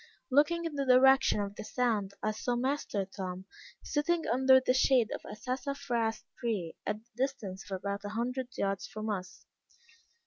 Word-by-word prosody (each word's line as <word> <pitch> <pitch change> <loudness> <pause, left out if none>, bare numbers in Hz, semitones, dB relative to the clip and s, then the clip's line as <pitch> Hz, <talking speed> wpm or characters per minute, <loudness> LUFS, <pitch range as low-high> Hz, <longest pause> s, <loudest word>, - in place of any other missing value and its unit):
Looking 300 +5 +3
in 330 - -3
the 280 -1 -1
direction 265 -2 +6
of 200 0 -3
the - - -6
sound, 215 -4 0
I 215 - +2
saw 240 +3 -2
master 245 -5 -1
Tom, 190 -1 -6 0.4
sitting 325 +3 0
under 260 +2 +6
the 255 -1 +1
shade 255 -3 +4
of - - -4
a - - -6
sassafras 250 -1 -2 0.2
tree, 210 -9 -2
at 210 - +1
the 235 - -37
distance 245 -8 -3
of 195 - -2
about 200 +1 -4
a 205 - -4
hundred 245 +4 -2
yards 195 -1 -1
from 215 0 -4
us. 185 -3 -6
240 Hz, 170 wpm, -31 LUFS, 205-265 Hz, 0.4 s, direction